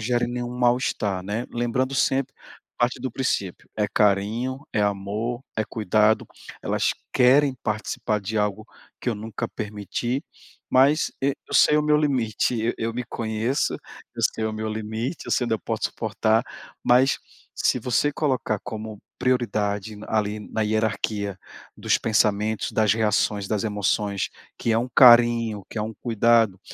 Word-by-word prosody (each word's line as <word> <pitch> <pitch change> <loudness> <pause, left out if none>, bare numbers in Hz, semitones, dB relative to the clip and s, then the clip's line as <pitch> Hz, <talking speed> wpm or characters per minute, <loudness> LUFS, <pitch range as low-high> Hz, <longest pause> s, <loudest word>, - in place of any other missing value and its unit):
gerem 120 +1 0
nenhum 120 0 -4
mal-estar, 120 -6 +1
né. 105 +6 -3
Lembrando 125 +3 -1
sempre, 135 0 +1 0.4
parte 120 +1 +1
do 130 0 -3
princípio, 100 -8 -2
é 105 - +2
carinho, 105 +6 +1
é 105 - +1
amor, 105 +5 -2
é 110 - +1
cuidado, 110 +1 +2 0.4
"elas - - +1 0.2
querem 135 +2 +4
participar 110 0 -2
de 110 +3 -4
algo 105 +1 -1 0.3
que - - -2
eu 115 - 0
nunca 110 0 -5
permiti, 110 - -3 0.5
mas, 140 +5 +4
e, 140 - +3 0.2
eu - - -6
sei 150 - +6
o - - +2
meu 150 0 +3
limite. 125 -7 +1
Eu 115 +2 0
eu 115 0 -2
me 125 +2 -4
conheço, 115 +4 -1 0.4
eu - - -5
sei 110 - -3
o 110 - -1
meu 110 0 -3
limite, 110 +6 -4
eu - - -7
sei 125 - +2
onde 115 - +1
eu 110 - -3
posso - - -3
suportar", 110 +1 +1 0.4
mas 130 +3 +4 0.4
se - - +1
você 130 +4 +1
colocar 130 -8 0
como 110 -2 -6 0.2
prioridade 110 -5 0
na 105 - -10
ali, 105 -1 0
na 110 - -5
hierarquia 105 -2 -1 0.4
dos - - +1
pensamentos, 110 -1 +1
das 110 -2 +3
reações, 105 -2 +1
das 105 0 -1
emoções, 105 -1 0 0.3
que 115 - -1
é - - +3
um 125 +2 -3
carinho, 120 -4 +6
que 110 - -5
é - - 0
um 110 +1 -5
cuidado, 115 -4 +3
110 Hz, 155 wpm, -24 LUFS, 105-125 Hz, 0.5 s, sei